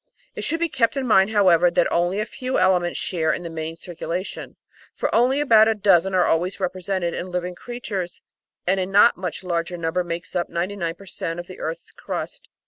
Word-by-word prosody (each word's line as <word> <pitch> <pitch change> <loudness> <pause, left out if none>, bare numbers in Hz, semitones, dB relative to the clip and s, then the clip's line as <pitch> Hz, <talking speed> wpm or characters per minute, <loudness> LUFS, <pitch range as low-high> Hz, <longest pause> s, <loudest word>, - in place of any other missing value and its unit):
It - - -4
should 330 +2 -1
be 340 - +1
kept 255 -4 +1
in 270 - -1
mind, 195 -4 +5
however, 180 -5 +5
that - - +2
only 175 +3 +1
a 215 - 0
few 255 +2 -3
elements 180 -2 +2
share 165 -4 0
in 175 - -3
the 170 - -6
main 160 0 -5
circulation, 175 +2 -5 0.4
for - - -2
only 255 +4 +3
about 225 -7 +6
a 225 - +2
dozen 195 -2 +3
are 180 - +4
always 175 +4 0
represented 185 -1 -2
in 185 - -4
living 180 0 -3
creatures 200 -5 -6 0.4
and 190 +2 +2
a 185 - -1
not 205 +4 +5
much 180 0 -5
larger 175 0 -2
number 170 +2 -1
makes 175 +2 -6
up 175 -1 0
99 170 -1 -2
per 195 - -14
cent, 175 -3 -5
of 175 - -6
the 185 - -11
earth's 160 +1 -5
crust. - - -6
185 Hz, 205 wpm, -23 LUFS, 175-205 Hz, 0.4 s, about